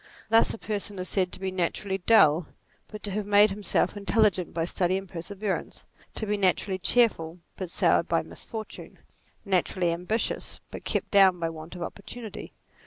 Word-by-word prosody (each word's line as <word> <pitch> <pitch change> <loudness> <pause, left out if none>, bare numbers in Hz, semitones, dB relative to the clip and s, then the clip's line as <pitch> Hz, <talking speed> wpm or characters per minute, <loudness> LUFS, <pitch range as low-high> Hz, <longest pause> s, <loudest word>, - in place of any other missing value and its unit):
Thus 225 +1 +5
a - - -4
person 205 -2 -4
is 185 0 -3
said 185 -2 +1
to - - -5
be 190 0 -3
naturally 190 +2 -2
dull, 165 -6 +5 0.4
but 215 -1 -10
to 205 - -3
have 205 +1 -3
made 205 0 +6
himself 205 +1 0
intel 205 +2 +2
ligent 185 -4 0
by 165 0 -1
study 180 +1 0
and 195 0 -6
perseverance; 190 +4 -4 0.3
to 220 - 0
be 210 0 0
naturally 190 0 +1
cheerful, 185 -6 +2 0.2
but 185 -3 -5
soured - - +2
by - - +1
misfortune; 220 -1 -9 0.5
naturally 185 -2 +1
ambi 170 +2 -4
tious, 225 +2 -1
but - - -8
kept - - -2
down 190 -3 +6
by 165 -1 -1
want 160 +2 -10
of 175 - -5
opportunity. 220 +4 -8
190 Hz, 175 wpm, -27 LUFS, 180-210 Hz, 0.5 s, made